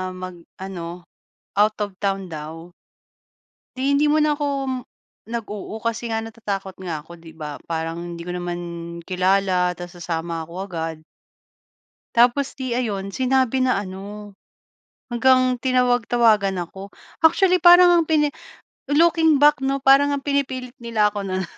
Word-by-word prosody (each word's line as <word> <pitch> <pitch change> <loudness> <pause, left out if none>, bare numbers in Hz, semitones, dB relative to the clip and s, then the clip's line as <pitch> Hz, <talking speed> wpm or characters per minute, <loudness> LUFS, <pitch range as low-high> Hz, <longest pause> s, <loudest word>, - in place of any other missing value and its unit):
mag 185 -2 -8 0.2
ano, 175 -2 -7 0.5
out 210 +1 +4
of 200 -2 -4
town 195 -2 -2
daw 165 +2 -8 1.0
di 260 +2 -1
hindi 295 +1 +3
muna 305 -1 +3
ako 290 0 -2 0.2
m - - -1 0.6
nag 230 -2 -3
oo 210 +1 -6
kasi 230 +1 -3
nga 225 - 0
natatakot 205 -4 -5
nga 165 -4 -3
ako 160 +3 -13
di 165 - -12
ba 150 -2 -7
parang 165 +1 -3
hindi 170 - -8
ko 180 - -3
naman 175 0 -4 0.5
kilala 185 -1 +2
tapos 175 0 -9
sasama 165 0 -3
ako 170 +2 -12
agad 165 -3 -4 1.2
tapos 250 +4 +3
'di 255 -2 -2
ayun, 205 -6 -2
sinabi 260 0 +2
na 255 -6 +2
ano, 205 +2 -8 0.8
hanggang 255 +1 +4
tinawag-tawagan 240 -6 +2
ako. 195 +3 -10 0.3
Actually, 365 +3 +5
parang 350 0 +8
ang - - -12
pini 300 -2 +3 0.6
looking 320 -1 +4
back 295 -2 +5
no 275 +1 0
para 275 +1 +7
ngang 285 -1 0
pinipilit 260 -3 -2
nila 225 -3 +1
ako 205 -1 -4
na 185 0 -2
210 Hz, 140 wpm, -22 LUFS, 180-260 Hz, 1.2 s, parang